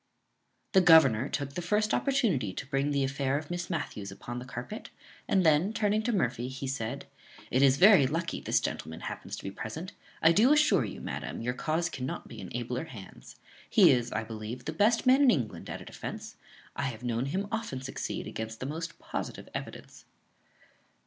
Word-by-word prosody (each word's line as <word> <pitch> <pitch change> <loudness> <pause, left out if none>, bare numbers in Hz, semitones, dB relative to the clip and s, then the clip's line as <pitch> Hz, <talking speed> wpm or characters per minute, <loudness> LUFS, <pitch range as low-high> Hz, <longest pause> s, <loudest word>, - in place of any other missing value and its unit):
The 190 - +6
governor 145 -8 +6
took 140 -1 -3
the 175 - -3
first 210 +4 +1
opportunity 210 - +1
to - - -5
bring 135 +1 0
the 140 -1 +1
affair 135 0 0
of 155 +2 -6
Miss 175 0 -3
Matthews 105 - -4
upon 120 +5 -6
the 125 - -8
carpet, 125 - -7 0.4
and 190 -3 +3
then, 160 +6 +4
turning 215 -1 +1
to 235 +2 0
Murphy, 125 - 0
he 130 +1 -6
said, 130 0 -3 0.5
"It 130 - +3
is 135 -1 +5
very 185 -6 +7
lucky 165 +4 -2
this - - +2
gentleman 80 +1 -5
happens - - -6
to - - -10
be 95 - -4
present; 160 - -6 0.3
I 165 - +7
do 220 - +5
assure 300 0 +4
you, - - -7
madam, - - -5
your 125 +1 -1
cause 160 +6 -1
cannot 135 -6 -5
be - - -9
in - - -7
abler 125 +4 -3
hands. 95 - -12 0.3
He - - +7
is, 120 -2 +1
I 110 +1 -1
believe, 110 +2 -7
the 155 - -3
best 215 +9 +3
man 260 +2 +6
in 280 - +6
England 125 - -1
at - - -5
a - - -10
defence; - - -7 0.4
I - - -2
have 120 -3 -5
known 120 +1 -1
him 190 +7 -2
often 225 - -3
succeed 135 0 -4
against 110 0 -6
the - - -4
most 165 +4 -5
positive - - -6
evidence." - - -8
140 Hz, 195 wpm, -29 LUFS, 125-180 Hz, 0.5 s, very